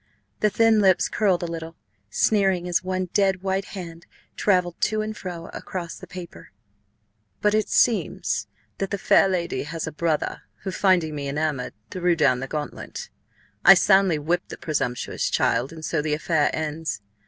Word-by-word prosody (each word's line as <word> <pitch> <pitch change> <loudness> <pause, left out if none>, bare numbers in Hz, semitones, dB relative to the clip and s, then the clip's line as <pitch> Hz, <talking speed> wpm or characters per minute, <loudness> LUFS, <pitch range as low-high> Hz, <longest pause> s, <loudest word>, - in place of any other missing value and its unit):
The 210 - +3
thin 225 +1 +4
lips 190 -3 +4
curled 190 -5 +1
a - - 0
little, 165 -1 -6 0.3
sneering, 195 -4 +2
as 175 +1 +1
one 185 0 -2
dead 190 -2 +2
white 190 0 0
hand 170 -2 -8 0.3
travelled 180 -4 +1
to 215 0 +1
and 215 0 -5
fro 175 -4 -7
across 175 -3 -5
the - - -11
paper. 170 - -10 0.4
"... 105 0 -46
but 210 0 +4
it 215 0 +1
seems 235 -3 +1 0.3
that 195 - -1
the 200 - -2
Fair 195 0 +4
Lady 170 -7 -1
has 160 +2 -4
a 160 - -4
Brother, 155 0 -1 0.2
who, 190 - -3
finding 185 -5 +2
Me 140 -2 -4
Enamoured, 145 -3 -2 0.2
threw 180 -1 +1
down 140 -6 +3
the 135 - -4
Gauntlet. 150 - -6 0.5
I 195 - +10
soundly 190 -3 +4
whipt 170 +4 -1
the - - -7
presumptuous 130 -6 -2
Child, 120 +5 +1
and 160 -1 -8
so 155 -1 0
the 150 0 0
Affair 155 -1 +1
ends. 155 -2 -3
175 Hz, 170 wpm, -24 LUFS, 155-190 Hz, 0.5 s, I